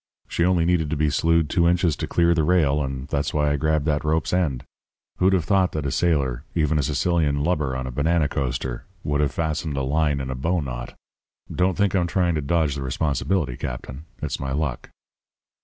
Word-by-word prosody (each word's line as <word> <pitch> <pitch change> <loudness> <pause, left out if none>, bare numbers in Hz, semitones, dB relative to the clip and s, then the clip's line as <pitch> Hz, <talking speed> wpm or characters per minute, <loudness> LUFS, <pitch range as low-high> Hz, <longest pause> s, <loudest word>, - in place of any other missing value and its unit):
She 85 - 0
only 90 -2 +3
needed 85 -3 +1
to 80 - -1
be 75 0 +1
slewed 85 +1 +2
two 85 +3 +2
inches 85 -3 +2
to - - -3
clear 85 0 +3
the 80 -2 +1
rail; 75 -4 +3
and 65 0 -5
that's 70 +1 -1
why 75 -1 +2
I - - +2
grabbed 75 0 0
that 75 -1 0
rope's 80 +2 0
end. 80 -9 0 0.6
Who'd 95 +1 +4
have 90 -5 +1
thought 95 -1 +2
that 75 -2 -3
a 70 - -1
sailor 70 -8 0
even 75 -2 +2
a - - +3
Sicilian 75 0 +1
lubber 75 -6 0
on 65 0 -3
a 65 - -4
banana 75 +4 +1
coaster 65 -2 -3 0.2
would 75 0 0
have 70 -2 +1
fastened 80 -1 -2
a 70 - 0
line 75 +1 +1
in 65 -1 -4
a - - -2
bow 85 +8 0
knot? - - -6 0.6
Don't 90 -1 +1
think 100 -1 +2
I'm 90 -3 +2
trying 90 -1 +1
to 75 - -1
dodge 75 0 +1
the 70 - -5
responsibility, 70 +2 -1
Captain. 65 +5 -6 0.2
It's - - -2
my 65 -1 -3
luck.' 70 -3 -2
75 Hz, 210 wpm, -23 LUFS, 70-85 Hz, 0.6 s, Who'd